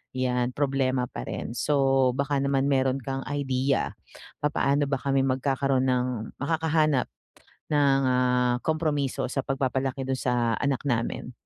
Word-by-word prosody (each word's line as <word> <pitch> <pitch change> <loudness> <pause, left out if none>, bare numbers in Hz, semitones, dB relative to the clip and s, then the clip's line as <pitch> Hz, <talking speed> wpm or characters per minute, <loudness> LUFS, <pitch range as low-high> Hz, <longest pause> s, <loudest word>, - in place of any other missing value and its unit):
yan, 125 -1 0
problema 135 -3 +1
pa - - -7
rin - - -4
so, 135 -1 +2
baka 140 0 0
naman 140 -1 +1
meron 135 -1 +2
kang 135 +1 -3
idea, 135 -1 0 0.5
papaano 145 -1 +1
ba 135 - 0
kami 135 -1 +2
magkakaroon 135 0 +1
ng 125 -1 +2 0.4
makakahanap 155 -2 +1 0.6
ng, 140 -2 +3
ah, 125 -1 +2
kompromiso 155 -4 0
sa - - -2
pagpapalaki 135 0 -1
dun 130 -1 0
sa 120 -3 +1
anak 140 -1 -1
namin? 120 0 -1
135 Hz, 130 wpm, -26 LUFS, 130-140 Hz, 0.6 s, ng